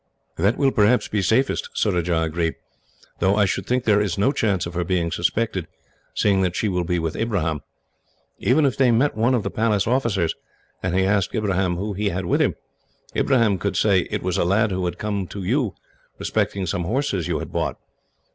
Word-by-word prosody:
"That 100 +7 +1
will 135 -2 +3
perhaps 110 +2 +3
be 105 - -1
safest," 115 +8 +1
Surajah 85 -5 +1
agreed, 80 0 -1 0.6
"though 95 +2 +3
I 105 -1 +4
should 95 - -2
think 125 0 +1
there 105 -2 +3
is 100 -5 -1
no 105 +7 +3
chance 105 -9 0
of 85 - -6
her 90 0 -1
being 85 -2 0
suspected, 95 +1 -1 0.5
seeing 100 -2 +2
that 90 -2 0
she 110 - 0
will 90 -3 0
be 90 +1 -1
with 80 -2 -2
Ibrahim. 85 -10 -1 0.8
Even 145 +5 +3
if 135 - +1
they 130 -2 +3
met 120 +5 +2
one 115 +4 +2
of 115 - 0
the - - -3
Palace 110 -3 +1
officers, 110 -9 +1 0.5
and 90 0 -1
he 95 0 +3
asked 100 +2 +1
Ibrahim 95 -4 0
who 100 +4 -3
he 100 +1 -1
had 95 0 -3
with 85 - +1
him, - - +2 0.6
he - - +1 0.3
could 100 -1 -2
say 95 -4 +3
it - - -3
was 90 -1 -1
a - - +3
lad 100 +4 +2
who 95 -1 -1
had 85 - -3
come 100 -3 -2
to 100 +1 -7
you 120 +2 0 0.4
respecting 95 -2 -1
some 90 0 -2
horses 105 - -1
you 85 - 0
had - - -6
bought." - - -2
100 Hz, 205 wpm, -22 LUFS, 90-110 Hz, 0.8 s, I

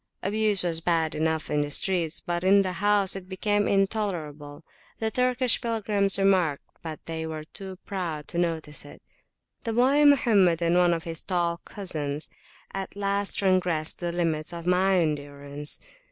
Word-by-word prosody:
Abuse 210 -1 +2
was 170 -2 +1
bad 165 -2 +1
enough 160 0 -1
in 150 0 +2
the 145 - -2
streets, 170 +1 +1
but 175 0 -3
in 195 +1 +5
the 185 - -2
house 205 -2 +3
it 185 -1 -8
became 205 +2 0
intolerable. 170 -8 -1 0.3
The 220 0 -2
Turkish 250 0 +2
pilgrims 210 -4 0
remarked, 185 -7 +2 0.2
but 160 -2 -8
they 160 0 -4
were 155 -1 -5
too 190 +4 -9
proud 170 -7 -4
to 170 - -2
notice 160 -3 -2
it. 145 - -14 0.6
The 230 - -2
boy 265 +5 +4
Mohammed 210 - +4
and 170 0 +1
one 175 -1 +4
of 165 - -5
his 165 -2 -4
tall 175 -2 0
cousins 155 -7 -4 0.4
at 195 0 -5
last 200 0 0
transgressed 180 -5 +1
the 175 -1 -2
limits 165 -3 -1
of 170 -1 -7
my 185 +1 +3
endurance. 145 -2 -2
175 Hz, 160 wpm, -26 LUFS, 160-200 Hz, 0.6 s, in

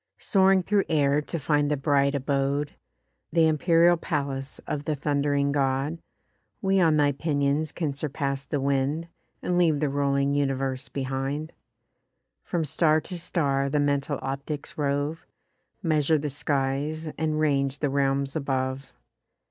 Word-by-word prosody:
Soaring 190 -1 +3
through 200 +1 +2
air 145 -1 +3
to 165 - -5
find 145 -1 +1
the 150 - +1
bright 140 0 +2
abode, 140 +1 0 0.6
Th' 170 - -6
empyreal 165 +2 +4
palace 140 -3 -3
of 145 -1 -3
the 155 - 0
thund'ring 140 0 +1
God, 140 +3 0 0.6
We 195 -2 +2
on 160 -3 +4
thy 145 -1 +4
pinions 145 +1 0
can 155 -5 -2
surpass 140 -1 -2
the 145 - -1
wind, 140 +4 0 0.3
And 180 0 +1
leave 160 -4 +3
the 150 -1 +1
rolling 140 0 +1
universe 135 -1 -1
behind: 135 +3 -3 0.9
From 170 -3 -1
star 155 +1 +3
to 180 +1 -6
star 140 -5 0
the 150 +1 +1
mental 145 0 0
optics 140 +2 -4
rove, 145 +2 -2 0.6
Measure 155 -2 +2
the 150 -1 -3
skies, 145 +3 -1
and 155 -1 -1
range 140 -2 +1
the 145 -1 -1
realms 135 0 0
above. 135 -2 -2
145 Hz, 140 wpm, -26 LUFS, 140-155 Hz, 0.9 s, empyreal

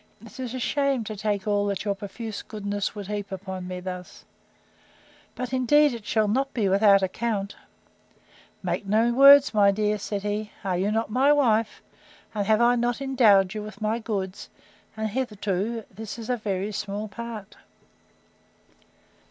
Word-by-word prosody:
—It 225 - -13
is 255 -1 -4
a - - -3
shame 275 -1 0
to 215 0 -6
take 205 -1 -2
all 205 -1 +1
that 200 0 -3
your 200 - +1
profuse 210 +2 -7
goodness 205 -1 -4
would 205 -1 -6
heap 205 -1 -5
upon 190 -1 -6
me 180 0 -5
thus: 180 0 -8 1.1
But 250 0 -5
indeed 280 +3 +4
it 230 -3 -8
shall 215 -1 +2
not 270 +6 0
be 215 -5 +1
without 195 0 +5
account.—Make 200 0 -6
no 225 +4 +3
words, 275 +1 +8
my 205 -2 +5
dear, 210 +1 0
said 200 0 -4
he: 210 +1 -3
Are 190 -2 -1
you 190 +3 0
not 225 -1 -1
my 265 +5 +4
wife? 230 -7 +2 0.5
And 205 -2 -2
have 220 +1 +3
I 240 +1 +5
not 240 0 0
endowed 220 -8 +4
you 215 - -4
with 210 -1 -9
my 220 +2 -1
goods; 200 -4 -4 0.5
and, 220 0 -1
hitherto, 215 -2 -2
this 220 +2 -7
is 230 +1 -4
a - - +2
very 200 -2 -3
small 210 +1 -4
part. 220 -1 -8
215 Hz, 160 wpm, -25 LUFS, 200-235 Hz, 1.1 s, words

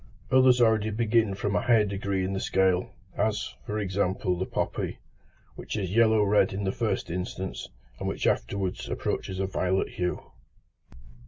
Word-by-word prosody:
Others 130 -1 +6
already 110 -2 +3
begin 110 -1 +1
from 100 +1 -2
a - - +2
higher 115 -3 +4
degree 100 -1 -2
in 95 - -2
the 95 - -1
scale, 95 -2 +1 0.3
as, 105 0 -1
for 105 - -2
example, 95 -2 0
the 95 +2 -3
poppy, - - -2 0.6
which - - -5
is 95 -1 -3
yellow 110 -2 +5
red 105 -1 +3
in 100 +1 -3
the 95 - 0
first 105 -5 -2
instance, 90 +1 -4 0.3
and - - -3
which - - -2
afterwards 95 -2 -1
approaches 95 0 -3
a 95 - +1
violet 95 0 0
hue. 90 0 -3
100 Hz, 160 wpm, -27 LUFS, 95-110 Hz, 0.6 s, Others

